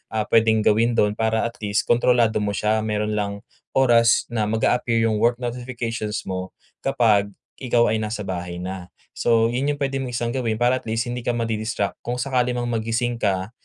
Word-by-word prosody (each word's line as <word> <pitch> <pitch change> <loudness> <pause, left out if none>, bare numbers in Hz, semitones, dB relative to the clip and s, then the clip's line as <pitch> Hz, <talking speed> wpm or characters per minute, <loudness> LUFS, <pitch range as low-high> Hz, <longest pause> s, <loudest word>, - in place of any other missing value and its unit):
ah, 110 - +1
puwedeng 110 -1 +4
gawin 115 +3 +3
do'n 105 0 +3
para 110 0 0
at 115 +1 -6
least 105 -1 0
kontrolado 120 -2 +3
mo 105 -1 -1
siya 110 +3 +1
mayroon 105 0 -1
lang 100 0 -4 0.3
oras 120 -3 +4
na 110 -3 0
mag-a-appear 115 +1 +1
'yong 110 -2 +1
work 120 +2 +3
notifications 120 -3 -4
mo 95 0 -4 0.3
kapag 110 -6 +2 0.3
ikaw 120 -3 +2
ay 110 - 0
nasa 105 0 -3
bahay 90 -2 -5
na. 95 -1 -6 0.2
So, 115 -1 +2
yun 130 +4 -1
yung - - -15
puwede 135 -1 -1
mong 125 -2 -4
isang 120 0 -1
gawin 120 -3 -1
para 120 +3 +2
at - - -16
least 115 +1 0
hindi 125 - -3
ka 120 0 -1
ma-di-distract 110 -3 -2
kung 120 - -4
sakali 125 -1 0
mang 120 0 -2
magising 115 +2 -1
ka 95 0 0
115 Hz, 190 wpm, -22 LUFS, 105-120 Hz, 0.3 s, puwedeng